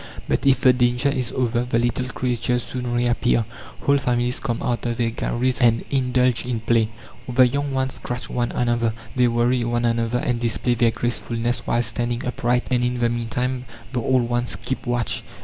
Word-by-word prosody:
But - - 0
if 135 - +4
the 130 - +6
danger 125 +2 +2
is 130 -3 -1
over, 120 -1 0
the 125 -1 0
little 120 +2 0
creatures 125 -1 -1
soon 125 -1 -4
reappear. 120 -1 +2 0.4
Whole 140 0 +3
families 125 -1 0
come 120 -4 -3
out 120 -3 -1
of 120 -1 -2
their 115 -1 +1
galleries 120 +1 -1
and 115 -1 +4
indulge 125 -2 +2
in 120 -2 -3
play. 115 -1 +2 0.4
The 125 0 +6
young 140 +3 -2
ones 130 0 -1
scratch 125 +1 -5
one 120 -1 -1
another, 120 -2 +1 0.2
they 125 -1 +4
worry 120 +1 +2
one 120 0 0
another, 115 0 +1
and 125 -1 -1
display 120 +1 0
their 120 0 +3
gracefulness 120 0 -2
while 120 +1 +2
standing 120 +1 -2
upright, 125 0 0
and 125 -1 +2
in 125 0 0
the 120 -1 +2
meantime 125 +2 -2 0.3
the 125 - 0
old 125 0 +2
ones 120 0 -1
keep 130 -1 -5
watch. 120 -1 -1
120 Hz, 185 wpm, -22 LUFS, 120-125 Hz, 0.4 s, the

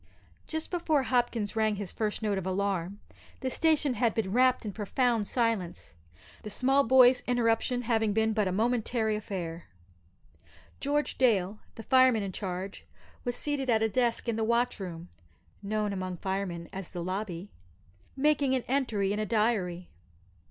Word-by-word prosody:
Just 315 0 -3
before 340 -3 0
poor 280 - +3
Hopkins 240 -5 0
rang 220 -1 +2
his 200 -2 -5
first 215 0 -2
note 205 -2 0
of 190 - -5
alarm 195 0 -1 0.4
the 260 -1 -2
station 310 -3 +2
had 230 -1 +1
been 210 -4 -1
wrapt 255 +1 +3
in 205 - -4
profound 225 +1 0
silence 225 - -1 0.5
the 215 - -7
small 270 +6 +2
boy's 250 0 +6
interruption 245 0 +1
having 225 -2 +1
been 220 +1 +1
but 210 -2 +1
a - - 0
momentary 225 +1 +1
affair. 175 -5 -5 1.1
George 295 +1 -1
Dale, 210 -5 +2 0.2
the 225 - -8
fireman 255 -3 +4
in 195 - -4
charge, 190 0 -5 0.4
was 245 -1 -2
seated 280 -1 -2
at 220 -2 +3
a - - +3
desk 240 +2 0
in 230 -1 0
the 225 - 0
watch 235 +1 +1
room 175 -2 -7 0.5
(known 210 0 -1
among 185 -2 -4
firemen 190 -2 -3
as 190 -2 -6
the 175 -2 -5
"lobby"), 185 0 -4 0.7
making 280 -1 +2
an 255 - -1
entry 225 -7 0
in 210 - -2
a 215 - 0
diary. 195 -5 0
220 Hz, 160 wpm, -29 LUFS, 195-250 Hz, 1.1 s, boy's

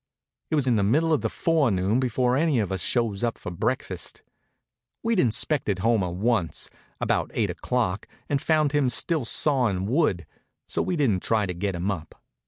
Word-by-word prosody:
It - - +1
was 145 -3 +2
in 120 -3 +2
the - - +2
middle 155 +10 +2
of 155 - +1
the - - -1
forenoon 120 - +1
before 125 0 +1
any 150 -1 +2
of 105 -4 0
us 95 -2 -2
shows 115 +2 0
up 120 -1 -1
for - - -7
breakfast. 85 - -3 0.8
We'd 230 -3 +1
inspected 120 - +1
Homer 110 -6 +2
once, 95 0 -1 0.3
about - - 0
eight - - +1
o'clock, 115 -6 -2 0.2
and 140 -2 0
found 155 -3 +2
him 145 -3 +2
still 150 +3 +1
sawin' 115 -9 +2
wood, 110 - +1 0.4
so - - 0
we 180 - -1
didn't 120 - +1
try 110 -2 +1
to 90 - -3
get 95 +2 -2
him 90 +4 -1
up. 85 -5 -7
120 Hz, 180 wpm, -25 LUFS, 100-145 Hz, 0.8 s, was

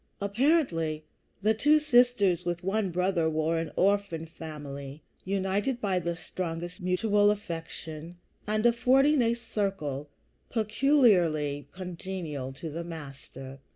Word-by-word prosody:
Apparently, 200 - +1 0.4
the 215 +1 +4
two 295 +8 +4
sisters 245 - +3
with 175 0 -3
one 195 +1 0
brother 180 -2 +1
were 160 +1 0
an 165 -2 -4
orphan 195 -4 +1
family, 145 -3 -8 0.2
united 200 +6 0
by 195 -5 0
the 170 0 -2
strongest 175 +1 -5
mutual 205 +3 +3
affection, 165 -4 -5 0.3
and 215 +1 0
affording 260 +4 +4
a 230 0 +2
circle 190 - -3 0.4
peculiarly 205 - +2
congenial 175 -6 -5
to 155 +4 -7
the 165 +3 -4
Master. 135 -4 -9
180 Hz, 115 wpm, -28 LUFS, 160-215 Hz, 0.4 s, the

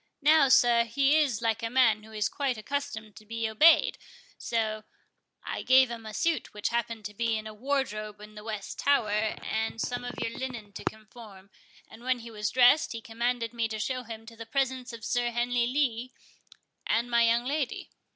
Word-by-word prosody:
Now, 305 -2 +6
sir, 235 -1 +5
he 275 +5 +2
is 265 -8 +1
like 225 -1 0
a 230 - -2
man 230 -4 +4
who 220 +1 -15
is 210 -1 0
quite 265 -1 -2
accustomed 220 -3 -4
to - - -12
be 225 +1 -3
obeyed, 305 +9 +5 0.4
so 215 -2 -2 0.6
I - - -4
gave 260 -1 +5
him 225 -2 -7
a 215 - -7
suit 335 -9 -1
which 210 - -1
happened 230 -2 -2
to 210 - -5
be 225 +1 0
in 215 - -6
a 215 - -7
wardrobe 215 -4 -2
in 210 0 -12
the 210 0 -10
west 215 -3 -6
tower, 280 -7 +2
and 220 +1 -2
some 245 +2 -2
of 245 0 -6
your 230 - -3
linen 240 -6 -6
to - - -8
conform; 215 -3 -8 0.4
and 235 - -14
when 255 0 +1
he 230 -1 -10
was 210 -2 -2
dressed, 255 +4 +5
he 230 - -6
commanded 235 0 -2
me 230 -1 0
to 220 0 -5
show 255 +4 -2
him 225 -2 -9
to 230 0 -12
the 225 0 -9
presence 260 0 -1
of 230 -1 -9
Sir 240 0 0
Henry 240 0 0
Lee 255 -2 -1 0.7
and 235 +2 +1
my 235 0 +4
young 235 +1 +2
lady. 280 -1 -2
230 Hz, 200 wpm, -28 LUFS, 220-255 Hz, 0.7 s, Now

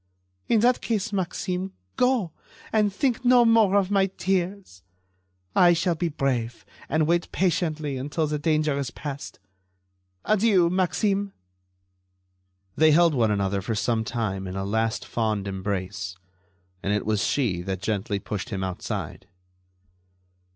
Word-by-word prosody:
"In 225 -2 +3
that 245 +1 +3
case, 210 -1 -2
Maxime, 185 0 -2 0.2
go, 250 -9 +2 0.4
and 210 -2 +3
think 250 +3 0
no 245 -1 +6
more 225 -4 +4
of 200 -1 +2
my 195 -1 +3
tears. 190 - -2 0.7
I 175 -1 +6
shall 170 +1 +1
be 170 +1 -1
brave, 125 -6 -2 0.2
and 155 +1 +2
wait 170 +2 0
patiently 155 -6 0
until 145 +5 -1
the 150 0 -2
danger 155 -1 +1
is 135 -3 -2
past. 140 +2 -7 0.9
Adieu, 200 -5 +3
Maxime." 195 +2 0 1.4
They 155 -1 +5
held 170 0 +5
one 115 -5 +2
another 100 -1 0
for 110 +4 -3
some 110 +1 0
time 100 -5 -3
in 95 - -6
a 95 0 -3
last 110 +3 -1
fond 110 -3 -1
embrace. 95 -1 -4 0.7
And 100 - -1
it 105 0 0
was 105 -1 +1
she 110 -11 0
that 95 0 -4
gently 105 0 -1
pushed 100 +3 -5
him 95 -3 -3
outside. 95 -1 -5
150 Hz, 135 wpm, -25 LUFS, -, 1.4 s, no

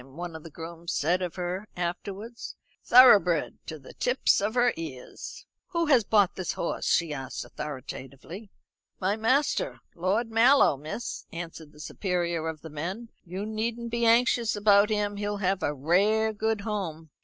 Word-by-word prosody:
one 165 +6 -8
of 160 - -8
the 165 - -10
grooms 165 +2 -7
said 175 +5 +1
of 180 -3 -3
her 180 +3 -4
afterwards. 195 +6 -5 0.3
"Thoroughbred 210 -10 +6
to 155 - -6
the 135 - -14
tips 250 -4 +2
of 210 +3 -1
her 245 0 +3
ears." 145 -6 -8 0.2
"Who 335 -2 0
has 270 -7 +4
bought 205 -2 +3
this 185 - -3
horse?" - - -3
she 165 -3 +2
asked 135 -2 -5
authoritatively. 145 - -8 0.5
"My 195 +2 +1
master, 270 - +1
Lord 200 +7 -1
Mallow, 235 - +5
miss," 155 - -6
answered 165 -2 -8
the 150 - -18
superior 170 -1 -2
of 160 -2 -5
the 160 - -9
men. 185 +10 -5 0.2
"You 185 +4 -5
needn't 230 +2 -3
be 235 0 +1
anxious 235 0 +3
about 205 0 +5
him; 205 -1 -1
he'll 205 0 -2
have 195 -1 0
a 145 - 0
rare 200 +10 +2
good 220 0 -1
home." 170 -8 -4
195 Hz, 160 wpm, -27 LUFS, 165-220 Hz, 0.5 s, Thoroughbred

